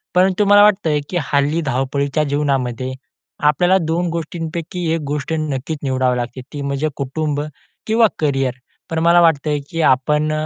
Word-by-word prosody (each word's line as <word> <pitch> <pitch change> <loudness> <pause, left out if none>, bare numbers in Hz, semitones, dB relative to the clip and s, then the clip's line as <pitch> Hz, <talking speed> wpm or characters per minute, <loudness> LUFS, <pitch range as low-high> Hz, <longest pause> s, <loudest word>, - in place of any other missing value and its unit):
परंतु 190 +2 +3
मला 205 +1 +6
वाटत 210 -4 +3
आहे, 150 -1 +2
की 180 - -2 0.2
हल्ली 145 +4 +2
धावपळीच्या 140 +2 0
जीवनामध्ये, 135 -3 -1 0.5
आपल्याला 175 +6 +3
2 170 +2 0
गोष्टींपैकी 165 +1 -4
1 165 - -1
गोष्ट 145 +1 -3
नक्कीच 150 0 -3
निवडावी 130 -2 +1
लागते 120 +1 -4
ती 145 - -5
म्हणजे 140 +2 -1
कुटुंब 145 +2 -2 0.5
किंवा 225 +1 +4
करियर. 135 -4 0 0.4
पण 165 -1 -1
मला 175 +1 +6
वाटत 160 -3 +3
आहे 150 -1 +1
की 165 0 -1
आपण 150 +3 +2
अ, 155 0 -1
150 Hz, 160 wpm, -19 LUFS, 140-165 Hz, 0.5 s, मला